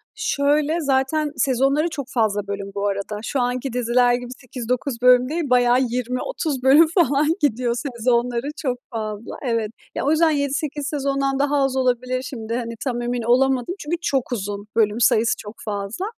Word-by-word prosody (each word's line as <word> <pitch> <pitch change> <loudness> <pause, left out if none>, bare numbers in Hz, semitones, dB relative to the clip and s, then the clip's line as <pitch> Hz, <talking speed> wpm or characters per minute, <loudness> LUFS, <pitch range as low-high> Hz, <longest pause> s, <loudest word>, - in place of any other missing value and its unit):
şöyle, 295 +3 +1
zaten 285 +2 +1
sezonları 275 +5 +2
çok 280 -4 -4
fazla 210 -4 0
bölüm 200 0 -5
bu 200 0 -1
arada. 200 +1 -3
Şu 275 - -2
anki 245 +1 -2
diziler 245 0 +3
gibi 245 0 -3
8-9 250 0 -4
bölüm 250 0 +5
değil, 315 -3 -2
bayağı 245 0 +4
20-30 255 - -2
bölüm 290 +5 +7
falan 300 -4 +2
gidiyor 245 -3 +1
sezonları 240 0 0
çok 255 -4 -2
fazla, 215 -1 -5
evet. 230 -5 -1 0.2
Ya, - - -2
o 295 - +3
yüzden 320 0 +4
7-8 285 0 -2
sezondan 275 -2 -1
daha 290 +1 +2
az 270 -1 0
olabilir 255 0 0
şimdi, 230 -4 -6
hani, 230 -1 -3
tam 245 -3 -2
emin 240 0 -2
olamadım 255 +5 +2
çünkü 320 +4 -2
çok 270 -6 -1
uzun 205 -2 -4
bölüm 220 0 +2
sayısı, 230 0 +4
çok 210 +1 -9
fazla. 210 - -3
250 Hz, 165 wpm, -22 LUFS, 235-280 Hz, 0.2 s, bölüm